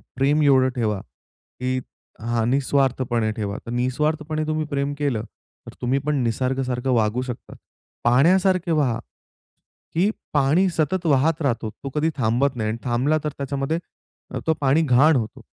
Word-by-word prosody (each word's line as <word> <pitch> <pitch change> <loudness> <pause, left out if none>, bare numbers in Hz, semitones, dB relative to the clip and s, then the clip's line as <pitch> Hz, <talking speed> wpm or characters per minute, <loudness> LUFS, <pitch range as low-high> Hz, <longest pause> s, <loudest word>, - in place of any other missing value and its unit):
प्रेम 140 +4 +2
एवढं 130 -2 +5
ठेवा, 110 -5 0
की 125 - -6 0.4
हां 115 0 0
निःस्वार्थपणे 130 -4 +1
ठेवा. 105 -2 -4
तर 115 - -6
निस्वार्थपणे 150 +5 -1
तुम्ही 155 0 -1
प्रेम 140 -1 -1
केलं, 135 -7 -1 0.4
तर - - -9
तुम्ही 130 +3 +1
पण 150 0 +1
निसर्ग 130 +3 0
सारखं 125 +1 -2
वागू 115 +1 +1
शकतात. 125 -2 -7 0.5
पाहण्यासारखे 175 +8 +3
वहा. 140 -7 +1 0.9
की 180 +5 +2 0.2
पाणी 150 +6 +3
सतत 170 +2 -1
वाहत 150 +3 +2
राहतो 120 -6 0
तो 135 - -3
कधी 155 +2 +1
थांबत 125 +3 +1
नाही 110 -2 -1
आणि 110 - -2
थांबला 130 +6 +1
तर 150 - 0
त्याच्यामध्ये 140 +3 -2 0.7
तो 160 - +4
पाणी 140 +4 +3
घाण 150 +2 +5
होतो. 115 -3 -3
135 Hz, 145 wpm, -23 LUFS, 120-150 Hz, 0.9 s, एवढं